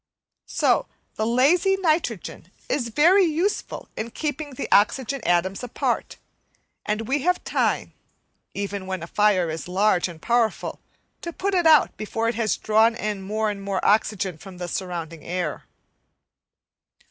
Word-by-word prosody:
So - - +2 0.3
the 215 - -2
lazy 330 - +3
nitrogen 310 - -1 0.2
is 250 -4 -1
very 345 - +5
useful 345 +5 -1
in 220 +2 -4
keeping 290 +2 -4
the 275 - -4
oxygen 260 +6 +2
atoms 175 +2 +1
apart; 245 - -2 0.7
and 215 +1 -1
we 275 +3 +1
have 360 +4 +1
time, - - 0 0.6
even 200 -1 -4
when 190 -3 -4
a - - -4
fire 195 -1 +2
is 160 - -5
very 180 - -8
large 195 -3 +3
and 170 -3 -10
powerful, 235 +3 0 0.4
to 340 - -5
put 390 +4 -2
it 350 -3 +3
out 310 -4 +5
before 225 +1 -2
it 230 - +1
has 225 -2 0
drawn 220 +2 +3
in 210 -4 -3
more 215 +2 -1
and 200 -1 -7
more 195 -1 -2
oxygen 200 -5 +1
from 190 +1 -11
the 175 0 -5
surrounding 170 -3 -5
air. 175 -3 -3
215 Hz, 150 wpm, -24 LUFS, 190-280 Hz, 0.7 s, very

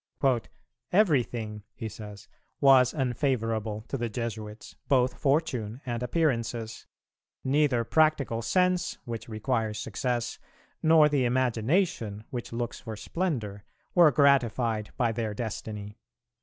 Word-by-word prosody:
"Everything," 120 - +1
he 115 - -5
says, 105 0 -10 0.3
"was 130 -3 +6
unfavourable 115 -6 -1
to 135 - -3
the 120 0 -1
Jesuits, 110 -2 -6
both 130 -2 +3
fortune 135 -6 0
and 120 -2 -3
appearances; 120 -5 -1 0.6
neither 135 -3 +2
practical 145 -4 +2
sense 180 +7 +1
which 115 -1 -6
requires 110 -1 -1
success, 120 +2 -2 0.4
nor 160 -1 +6
the 145 -3 +1
imagination 120 - 0
which 120 -2 -5
looks 120 0 -3
for 110 -2 -7
splendour, 110 - -3 0.3
were 170 -3 +7
gratified 120 -5 +2
by 120 -2 +2
their 110 -2 -3
destiny. 105 -2 -6
120 Hz, 110 wpm, -28 LUFS, 110-140 Hz, 0.6 s, were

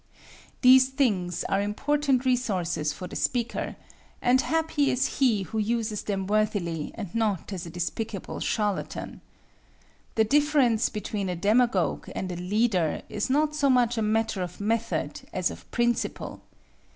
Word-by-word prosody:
These 260 0 +7
things 205 - 0
are 195 0 0
important 270 +5 +1
resources 185 - 0
for 180 - -7
the - - -8
speaker, 240 -2 -1 0.4
and 250 +1 +4
happy 320 -2 +1
is 265 +3 0
he 230 -7 +3
who 220 +3 -4
uses 220 -1 -1
them 195 -2 -2
worthily 200 -6 0
and 200 -6 -6
not 210 -4 -1
as 175 -2 -5
a - - -7
despicable 190 +4 -4
charlatan. 210 -3 -2 0.9
The 220 - +4
difference 275 -3 +3
between 205 -2 -3
a 180 - -2
demagogue 205 +1 +1
and 185 -1 -3
a - - -4
leader 185 -2 0
is 210 +3 -2
not 300 +3 +2
so 285 -2 +2
much 245 -2 +3
a 225 - -1
matter 220 -2 0
of 180 -1 -5
method 225 +2 -1
as - - 0
of - - -12
principle. 240 0 -1
220 Hz, 145 wpm, -27 LUFS, 195-250 Hz, 0.9 s, These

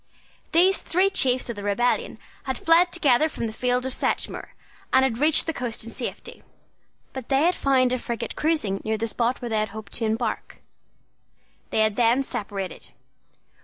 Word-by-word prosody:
These 370 +4 +4
three 375 +3 +2
chiefs 255 -9 +2
of - - -7
the 205 - -7
rebellion 205 +5 0 0.3
had 265 -2 -2
fled 340 +2 +4
together 305 -3 +3
from 235 - -5
the 220 - -4
field 250 +2 0
of 260 - 0
Sedgemoor, - - -2 0.4
and 260 0 +5
had 235 -3 -2
reached 310 +2 +3
the 325 - -2
coast 245 -6 -4
in 230 - -9
safety. - - -7 0.7
But 260 -3 -7
they 275 +2 +3
had 350 +2 +3
found 260 -4 +2
a 255 - -1
frigate 235 -1 -5
cruising 300 -12 0
near 220 0 -1
the 225 - -2
spot 235 +2 -1
where 240 - -3
they 220 -1 0
had 215 0 -1
hoped 215 -1 -9
to 225 - 0
embark. 220 +1 -2 1.1
They - - +1
had 215 -1 +1
then 240 +3 +3
separated. 200 -7 -5
245 Hz, 180 wpm, -24 LUFS, 220-275 Hz, 1.1 s, and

